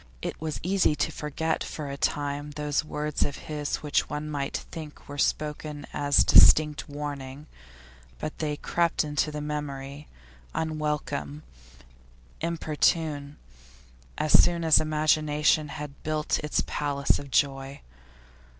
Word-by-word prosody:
It - - -4
was 155 -1 -3
easy 185 -3 +2
to - - 0
forget 160 +2 -2
for 150 -2 -6
a 140 - -4
time 145 +1 -1
those 150 0 0
words 150 -1 -2
of 140 - -2
his 150 0 -3
which 145 -1 +1
one 150 +2 -4
might 140 -2 -2
think 155 -2 -9
were 145 0 -7
spoken 150 0 -1
as 145 -1 +3
distinct 150 0 +6
warning; 145 -1 -6 0.7
but 155 - -5
they 150 -2 -1
crept 170 +2 +1
into 150 0 0
the 150 0 -4
memory, 145 -1 -5 0.5
unwelcome, 150 -1 -2 1.0
importunate, 155 -2 0 0.8
as 155 - 0
soon 170 -1 +6
as 160 -2 +6
imagination 155 0 +2
had 145 -1 -8
built 155 0 0
its 150 -1 0
palace 140 -1 0
of 140 - -9
joy. 135 0 0
150 Hz, 125 wpm, -27 LUFS, 145-155 Hz, 1.0 s, distinct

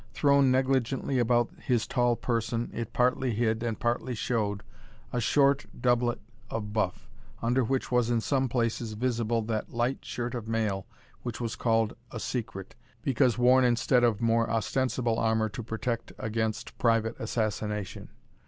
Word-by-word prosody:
Thrown 140 -2 +4
negligently 130 0 +1
about 120 0 +2
his 120 -3 0
tall 120 -2 +2
person, 115 0 -1
it 115 -2 -4
partly 125 -1 +1
hid, 110 0 +1
and 115 -2 -2
partly 120 +1 -1
showed, 105 -3 -1 0.5
a 120 - 0
short 140 +4 +3
doublet 120 0 +2 0.3
of 105 -2 -4
buff, 105 -5 -1 0.3
under 125 +3 +2
which 130 +3 -1
was 125 -1 +3
in 120 -1 +2
some 130 +2 0
places 115 -2 -1
visible 115 0 0
that 110 -1 -3
light 120 +3 0
shirt 120 +1 -4
of 120 -3 -5
mail 110 -4 -1 0.3
which 120 -2 -5
was 115 -2 -3
called 115 -2 +1 0.2
a 115 - -6
secret, 105 -6 -4 0.3
because 130 -2 +2
worn 125 +1 +5
instead 120 +1 +3
of 115 -3 +2
more 115 0 +2
ostensible 120 0 0
armour 110 -1 +2
to 110 - -6
protect 115 +1 -3
against 110 0 -2
private 115 -1 +2
assassination. 105 -2 -3
120 Hz, 150 wpm, -28 LUFS, 110-125 Hz, 0.5 s, worn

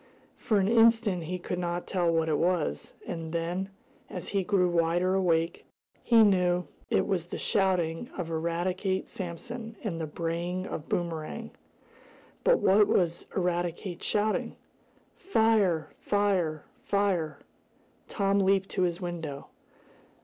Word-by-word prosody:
For 215 - +1
an 190 - +2
instant 225 -5 +4
he 180 +3 -3
could 180 0 -4
not 175 0 -2
tell 175 -3 +1
what 165 -1 +1
it 155 -2 +1
was, 170 - 0
and 165 -2 -5
then, 175 +3 -2 0.4
as 180 - -5
he 195 -2 0
grew 185 -1 +2
wider 175 +2 +2
awake 170 -3 +1 0.4
he 230 -2 +6
knew 180 -3 +3 0.2
that - - +3
it - - +2
was 175 -3 -1
the - - -5
shouting 185 0 0
of 170 -3 -4
Eradicate 175 +4 -1
Sampson, 225 +6 -6
and 170 -7 -3
the 160 - -2
braying 170 +3 -3
of 155 - -6
Boomerang. 170 +6 -3 0.9
But - - +5
what 200 +2 +5
was 170 -2 +1
Eradicate 175 0 -2
shouting? 210 0 0 0.6
"Fire! 220 - +2
Fire! 190 -7 0 0.2
Fire!" 190 -6 0 0.7
Tom 200 -1 +1
leaped 195 0 +2
to - - -2
his 175 0 0
window. 165 -5 -5
180 Hz, 135 wpm, -28 LUFS, 170-195 Hz, 0.9 s, he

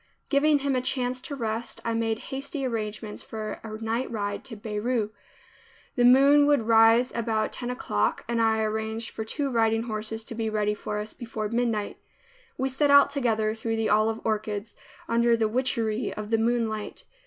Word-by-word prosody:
Giving 295 +1 +4
him 280 -1 -1
a 255 - +1
chance 255 -1 -1
to 285 - -6
rest, 230 -2 -3
I 230 - 0
made 225 -1 0 0.2
hasty 275 +1 -4
arrangements 215 -3 -4
for 215 -1 -6
a 215 -1 -6
night 230 +3 -1
ride 205 -2 -3
to 225 - -7
Beirut. 215 +1 -2 0.8
The 245 - +2
moon 280 +4 +6
would 290 -5 +3
rise 225 +2 +5
about 225 -2 -1
ten 245 - -4
o'clock 105 - -1
and 235 0 0
I 220 -1 +2
arranged 220 +1 -2
for 220 - -5
two 275 +5 -2
riding 225 -1 +2
horses 220 0 -4
to 230 - -8
be 225 -1 -2
ready 210 -1 0
for 210 0 -4
us 210 +1 -5
before 220 -3 -5
midnight. 230 -3 -1 0.6
We 265 - 0
set 280 +2 +1
out 280 0 +7
together 225 -6 0
through 225 0 -3
the 225 -1 0
olive 220 +1 +2
orchards 215 -1 -2 0.3
under 235 0 +3
the 225 -1 +2
witchery 230 -1 -1
of 215 +1 -6
the 225 - +3
moonlight. 225 -2 -1
225 Hz, 175 wpm, -26 LUFS, 215-250 Hz, 0.8 s, out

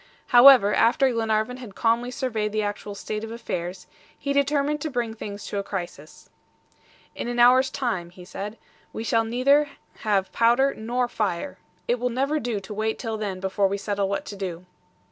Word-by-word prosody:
However, 245 -4 +8
after 255 +3 +3
Glenarvan 225 +1 0
had 235 -6 -10
calmly 235 +3 +1
surveyed 220 -5 -2
the 215 0 0
actual 205 0 -4
state 210 +1 -5
of 225 - -5
affairs, 180 -5 -5 0.3
he 280 0 -2
determined 285 +1 +1
to 310 - -2
bring 240 -4 -2
things 205 -2 -7
to 205 - -3
a - - -3
crisis. 175 -6 -7 0.9
"In - - -5
an 240 0 -3
hour's 255 +2 +6
time," 235 -12 -2
he 180 0 -13
said, 205 +4 -6 0.4
"we 220 - -4
shall 230 0 +2
neither 275 +6 +3 0.3
have 200 -3 0
powder 240 +4 +3
nor 240 +3 -1
fire. 215 +1 -3 0.3
It 240 +1 +1
will 250 +1 0
never 275 +5 0
do 230 -5 -2
to 195 +2 -8
wait 220 +1 -1
till 225 -2 -4
then 195 -3 -3
before 190 +1 +1
we 200 +1 -2
settle 200 -1 -2
what 200 - -2
to 205 - -7
do." 185 -3 -5
225 Hz, 185 wpm, -25 LUFS, 200-250 Hz, 0.9 s, However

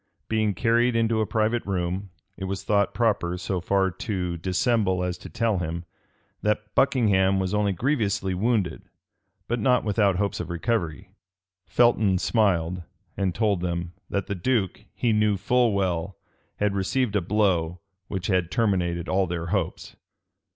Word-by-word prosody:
Being 110 -2 +1
carried 120 +3 +2
into 115 -1 +2
a 110 - 0
private 115 +2 +1
room, 95 +1 -2 0.3
it 95 - -5
was 95 0 -4
thought 100 -1 +2
proper 100 -7 +1
so 90 0 -2
far 95 +1 +1
to 90 -4 -3
dissemble 95 +1 +1
as 90 -1 -1
to - - -10
tell 110 -5 0
him, 85 0 -4 0.6
that 105 0 -1
Buckingham 100 -8 +3
was 95 +1 -1
only 105 -1 +2
grievously 105 - 0
wounded, 100 -3 0 0.7
but 120 +1 -1
not 125 +3 +3
without 100 -2 +2
hopes 100 +2 -1
of - - -5
recovery. 90 -1 -2 0.6
Felton 110 -5 +3
smiled, 90 -4 +1 0.3
and 95 -3 -1
told 105 -4 +1
them, 85 -1 -3 0.2
that 100 -1 -1
the - - -3
duke, 100 0 -1
he 115 -2 +1
knew 105 -1 +2
full 120 +4 +2
well, 95 -2 -1 0.4
had 105 -1 0
received 105 +4 0
a 100 - +3
blow 90 -3 +1 0.3
which 95 -2 -4
had 90 -4 +1
terminated 90 -5 0
all 95 0 +1
their 85 -1 -3
hopes. 95 -6 -2
100 Hz, 150 wpm, -25 LUFS, 90-110 Hz, 0.7 s, Buckingham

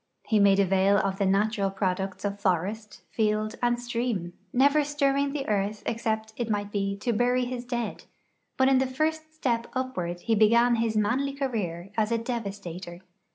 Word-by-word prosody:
He 215 - +2
made 200 -1 +5
avail 195 +1 +4
of 195 0 -1
the 200 - +2
natural 200 +1 +1
products 190 0 -2
of 200 0 -2
forest, 200 +3 -2
field, 215 0 0
and 240 0 +2
stream, 235 -7 -2 0.2
never 280 +4 +4
stirring 280 -1 +1
the 275 -1 -4
earth 205 0 -1
ex 230 0 -2
cept, 220 0 -1
it 235 -2 -2
might 205 -1 -1
he, 200 -1 -1
to 235 +4 -1
bury 245 +3 +2
his 245 0 -5
dead; 240 -3 -4 0.5
hut 260 - +4
in 265 -1 +5
the 265 - +1
first 310 +4 -2
step 235 -6 -1
upward 180 -10 -3
he 230 - 0
began 235 +3 +4
his 225 -1 0
manly 255 +7 +1
career 200 -10 -3
as 215 +1 +1
a 230 - +2
devastator. 195 -7 -5
220 Hz, 175 wpm, -27 LUFS, 200-245 Hz, 0.5 s, made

